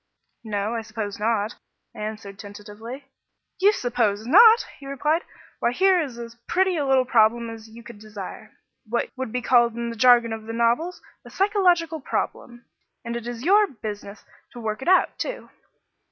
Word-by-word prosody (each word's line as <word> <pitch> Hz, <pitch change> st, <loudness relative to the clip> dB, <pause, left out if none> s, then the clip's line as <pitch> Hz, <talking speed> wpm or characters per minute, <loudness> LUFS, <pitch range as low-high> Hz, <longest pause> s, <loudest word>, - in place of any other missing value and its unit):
"No, 210 Hz, 0 st, -2 dB
I 230 Hz, -, -2 dB
suppose 220 Hz, -2 st, -6 dB
not," 220 Hz, 0 st, -1 dB, 0.4 s
I -, -, -12 dB
answered 210 Hz, -2 st, -6 dB
tentatively. 210 Hz, +6 st, -10 dB, 0.5 s
"You 400 Hz, +3 st, +6 dB
suppose 225 Hz, -, -1 dB
not!" 445 Hz, -, +7 dB
he 275 Hz, -, -11 dB
replied. 300 Hz, +4 st, 0 dB, 0.4 s
"Why 240 Hz, -, +1 dB
here 375 Hz, +3 st, +4 dB
is 265 Hz, -6 st, -5 dB
as 235 Hz, -1 st, -8 dB
pretty 375 Hz, 0 st, +2 dB
a 290 Hz, -4 st, -1 dB
little 265 Hz, -1 st, +3 dB
problem 230 Hz, 0 st, +3 dB
as 225 Hz, 0 st, -11 dB
you 230 Hz, +1 st, -13 dB
could 230 Hz, -1 st, -12 dB
desire 210 Hz, -3 st, -9 dB, 0.4 s
what 235 Hz, +1 st, -1 dB
would 260 Hz, -3 st, -5 dB
be 250 Hz, +1 st, -3 dB
called 240 Hz, -2 st, +4 dB
in 235 Hz, 0 st, -3 dB
the -, -, -7 dB
jargon 235 Hz, -1 st, +5 dB
of 220 Hz, 0 st, -8 dB
the 225 Hz, -, -5 dB
novels, 235 Hz, +10 st, 0 dB, 0.2 s
a -, -, -13 dB
psychological 360 Hz, -5 st, +1 dB
problem 240 Hz, -2 st, -4 dB, 0.4 s
and 235 Hz, 0 st, -4 dB
it 235 Hz, 0 st, -5 dB
is 240 Hz, +2 st, -6 dB
your 410 Hz, +3 st, +5 dB
business 210 Hz, -, -8 dB, 0.3 s
to 245 Hz, -, -9 dB
work 215 Hz, -1 st, -4 dB
it 265 Hz, -, -7 dB
out, 370 Hz, +1 st, +3 dB
too." -, -, -5 dB
235 Hz, 175 wpm, -24 LUFS, 220-290 Hz, 0.5 s, not